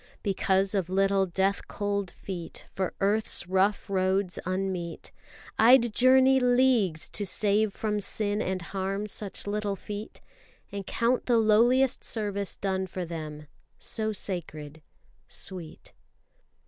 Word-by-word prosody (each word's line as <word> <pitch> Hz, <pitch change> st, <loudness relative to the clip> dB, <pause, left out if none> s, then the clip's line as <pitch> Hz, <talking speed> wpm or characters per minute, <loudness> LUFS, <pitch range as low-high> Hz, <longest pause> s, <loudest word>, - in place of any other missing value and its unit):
Because 195 Hz, -1 st, +1 dB
of 190 Hz, -4 st, -1 dB
little 195 Hz, 0 st, +2 dB
death 190 Hz, +3 st, 0 dB
cold 200 Hz, -2 st, -2 dB
feet, 175 Hz, -3 st, -8 dB
for 190 Hz, -2 st, -3 dB
earth's 205 Hz, -2 st, +1 dB
Rough 190 Hz, +3 st, +1 dB
roads 190 Hz, -1 st, 0 dB
unmeet, 185 Hz, -2 st, -3 dB, 0.5 s
I'd 235 Hz, 0 st, +6 dB
journey 260 Hz, +2 st, +5 dB
leagues 245 Hz, -9 st, +3 dB
to 205 Hz, -, -1 dB
save 205 Hz, +2 st, +2 dB
from 210 Hz, 0 st, -2 dB
sin 205 Hz, +1 st, -1 dB
and 185 Hz, -1 st, -2 dB
harm 195 Hz, +3 st, -3 dB
Such 205 Hz, -1 st, -3 dB
little 205 Hz, 0 st, -2 dB
feet. 205 Hz, +2 st, -8 dB, 0.5 s
And 200 Hz, -1 st, -6 dB
count 240 Hz, +2 st, 0 dB
the 240 Hz, -2 st, +4 dB
lowliest 235 Hz, +4 st, +3 dB
service 200 Hz, -3 st, -2 dB
done 190 Hz, -1 st, -2 dB
for 185 Hz, -1 st, -5 dB
them 155 Hz, -2 st, -7 dB, 0.3 s
So 220 Hz, -1 st, -1 dB
sacred 160 Hz, -6 st, -4 dB, 0.5 s
sweet. 175 Hz, -4 st, -9 dB
200 Hz, 120 wpm, -27 LUFS, 185-215 Hz, 0.5 s, I'd